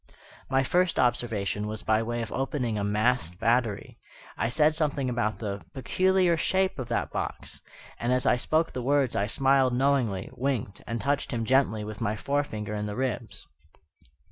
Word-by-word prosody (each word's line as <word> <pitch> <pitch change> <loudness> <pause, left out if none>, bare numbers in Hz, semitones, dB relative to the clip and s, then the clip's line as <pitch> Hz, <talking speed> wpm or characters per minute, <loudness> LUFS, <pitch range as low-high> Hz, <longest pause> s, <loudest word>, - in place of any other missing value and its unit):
My 135 0 +3
first 180 +5 +1
observation 110 -4 0
was 110 0 -6
by 110 0 +2
way 120 +1 -2
of 110 - -7
opening 130 -3 -1
a 105 - -1
masked 105 -3 0
battery. 115 -3 0 0.4
I 115 - 0
said 150 +5 +3
something 145 -5 -1
about 115 -3 -1
the 100 -4 -5
"peculiar 185 +4 +2
shape 190 0 +1
of 130 - -4
that - - -1
box"; - - -5 0.4
and, 120 - 0
as 125 0 +2
I - - +5
spoke 155 +6 0
the 125 - -3
words 135 0 +2
I 100 - +1
smiled 135 +1 +3
knowingly, 125 -8 +1
winked, 130 -6 -2
and 115 0 -2
touched 140 +3 0
him 115 -3 -2
gently 130 -4 +2
with 105 0 -7
my 105 - 0
forefinger 110 -5 -2
in 105 0 -2
the 105 - -4
ribs. 130 -4 -3
125 Hz, 170 wpm, -27 LUFS, 110-140 Hz, 0.4 s, I